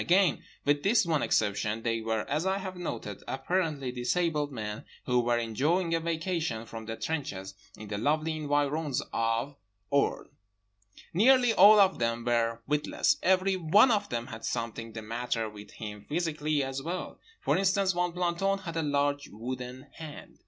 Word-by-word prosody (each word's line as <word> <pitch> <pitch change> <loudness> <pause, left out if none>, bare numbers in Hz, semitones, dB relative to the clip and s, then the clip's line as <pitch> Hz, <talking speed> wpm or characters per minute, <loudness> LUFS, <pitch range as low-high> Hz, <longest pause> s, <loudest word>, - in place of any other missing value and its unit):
Again 180 -2 +3 0.2
with 145 0 +3
this 200 +3 +3
one 160 -3 +1
exception, 105 +1 0
they 115 -1 0
were 110 -1 -1
(as 150 +3 0
I 190 +1 +1
have 190 -1 -5
noted) 115 - -5
apparently 145 -2 -1
disabled 150 +4 0
men 105 -3 -5 0.2
who 125 0 +2
were 120 0 +2
enjoying 150 - 0
a 165 - +2
vacation 165 -7 -2
from 115 -1 -8
the 115 - -3
trenches 100 -11 -4 0.2
in 110 - -9
the 105 0 -3
lovely 155 +6 +1
environs 145 -1 0
of 115 +5 0 0.3
Orne. 140 0 +1 0.8
Nearly 245 +5 +5
all 210 +2 +8
of 195 -1 +4
them 115 0 -1
were 115 -1 +1
witless. 150 +1 +1
Every 190 +1 +3
one 195 +8 +5
of 210 -2 +1
them 120 -1 -2
had 115 -3 -9
something 115 -1 -3
the 110 0 -6
matter 115 0 -2
with 105 -1 -11
him 105 -2 -7
physically 155 -2 0
as 135 0 -3
well. 175 +5 -5 0.2
For - - +1
instance, 190 0 +2
one 175 0 0
planton 180 +3 0
had 165 -1 -4
a - - +1
large 145 -1 0
wooden 125 +3 -6
hand. 155 -2 -10
145 Hz, 165 wpm, -29 LUFS, 115-170 Hz, 0.8 s, all